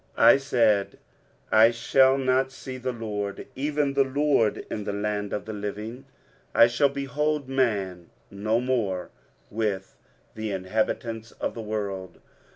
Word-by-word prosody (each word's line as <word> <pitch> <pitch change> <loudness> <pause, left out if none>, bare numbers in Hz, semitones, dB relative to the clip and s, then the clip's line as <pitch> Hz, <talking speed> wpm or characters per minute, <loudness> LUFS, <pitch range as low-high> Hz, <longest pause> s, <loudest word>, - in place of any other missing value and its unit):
23:038:011 - - +4
I - - +4
said, 115 -7 +1 0.5
I 110 +1 +7
shall 130 +3 +4
not 130 0 +1
see 130 -1 -8
the 130 +1 -2
LORD, 105 -4 -4
even 145 0 0
the 140 0 +4
LORD, 135 -5 +1
in 105 - -3
the 105 0 -3
land 105 0 -2
of 105 - -3
the 110 - -5
living: 105 +4 -6 0.5
I - - +8
shall 120 +4 +2
behold 140 +1 -1
man 100 -10 -1 0.2
no 110 +3 0
more 115 -8 -1 0.4
with 100 -3 -2 0.4
the 110 0 -4
inhabitants 110 +3 -2
of - - -3
the 115 - -6
world. 100 -4 -4
115 Hz, 145 wpm, -26 LUFS, 105-130 Hz, 0.5 s, I